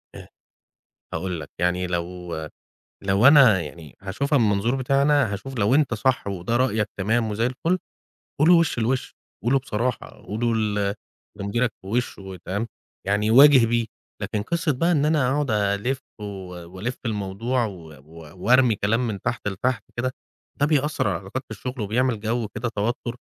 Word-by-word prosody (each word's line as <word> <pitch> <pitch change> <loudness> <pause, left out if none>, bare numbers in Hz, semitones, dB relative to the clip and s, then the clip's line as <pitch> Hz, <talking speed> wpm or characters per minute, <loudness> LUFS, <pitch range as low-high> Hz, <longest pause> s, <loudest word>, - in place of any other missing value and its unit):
آآ - - -10 0.9
هاقول 90 +1 -3
لك 80 - -8
يعني، 90 +1 +1
لو 90 0 -4 0.7
لو 100 +4 +4
أنا 135 -9 +7
يعني 80 -1 -9
هاشوفها 140 +10 0
من 115 -3 +3
منظور 105 +5 +1
بتاعي 135 +1 +1
أنا 145 -6 +3
هاشوف، 130 +6 -6
لو 105 +5 +3
أنت 145 -5 +3
صح، 125 +1 0
وده 100 +4 -1
رأيك، 110 -4 +1
تمام، 110 +3 +1
وزي 115 +3 0
الفُل، 165 +8 0 0.6
قوله 160 +4 +6
له 175 - +8
وش 165 -6 +1
لوش، 120 +3 -1 0.3
قوله 120 +4 +1
له - - +5
بصراحة، 125 -1 -2 0.2
قوله 115 +3 0
ل 105 -2 0 0.5
لمديرك 115 +4 0
في - - -13
وشه، 100 -4 -3
تمام، 100 +5 -2 0.4
يعني 105 +2 +1
واجه 135 -1 +8
بيه، 115 0 +1 0.4
لكن 105 - -2
قصة 165 +6 0
بقى 165 +7 +1
إن 145 -3 +2
أنا 150 -5 +2
أقعد 145 -2 0
ألِف 105 +5 0 0.2
وألِف 95 +2 -6
الموضوع، 110 +4 -1
و 90 -7 -7 0.2
و 80 +3 -13
وأرمي 125 -1 +5
كلام 115 +5 +1
من 100 -4 -4
تحت 120 0 -2
لتحت 110 +3 -1
كده، 130 +2 -1 0.5
ده 145 - +4
بيأثّر 150 -5 +1
على 95 - 0
العلاقات 95 +9 -5
في - - -53
الشغل، 125 +2 -6
وبيعمل 115 +2 0
جو 115 +1 -1
كده 110 +3 -4
توتر، 115 +3 -2
115 Hz, 165 wpm, -24 LUFS, 100-130 Hz, 0.9 s, له